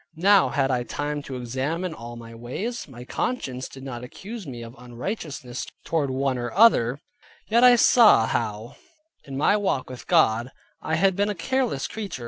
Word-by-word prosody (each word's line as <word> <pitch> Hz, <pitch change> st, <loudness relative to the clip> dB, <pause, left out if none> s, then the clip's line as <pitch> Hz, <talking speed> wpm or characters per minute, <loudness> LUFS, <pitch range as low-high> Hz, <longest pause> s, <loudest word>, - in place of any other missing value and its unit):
Now 195 Hz, +3 st, +5 dB
had 135 Hz, -1 st, +1 dB
I 125 Hz, -1 st, +1 dB
time 145 Hz, +4 st, -3 dB
to 135 Hz, -2 st, -7 dB
examine 135 Hz, +8 st, -3 dB
all 120 Hz, -3 st, -9 dB
my 115 Hz, -1 st, -10 dB
ways: 155 Hz, -, -5 dB
my 125 Hz, -3 st, -11 dB
conscience 130 Hz, -, -3 dB
did 135 Hz, -, -11 dB
not 125 Hz, -3 st, -6 dB
accuse 200 Hz, -, -8 dB
me 120 Hz, -3 st, -7 dB
of 115 Hz, 0 st, -10 dB
unrighteousness 125 Hz, -, -6 dB, 0.2 s
toward 150 Hz, -4 st, 0 dB
one 130 Hz, -1 st, -1 dB
or 120 Hz, 0 st, -3 dB
other; 140 Hz, -, +5 dB, 0.5 s
yet 235 Hz, +3 st, +4 dB
I 250 Hz, -1 st, +9 dB
saw 225 Hz, -, +6 dB
how 115 Hz, +1 st, -3 dB, 0.5 s
in 135 Hz, -1 st, -6 dB
my 155 Hz, +8 st, +3 dB
walk 190 Hz, -11 st, -1 dB
with 125 Hz, -, -10 dB
God, 115 Hz, +4 st, +3 dB, 0.3 s
I 160 Hz, -, -1 dB
had 190 Hz, +3 st, +3 dB
been 200 Hz, +2 st, +1 dB
a 205 Hz, -, -2 dB
careless 250 Hz, -, -1 dB
creature. 205 Hz, -10 st, -6 dB
135 Hz, 175 wpm, -24 LUFS, 120-195 Hz, 0.5 s, I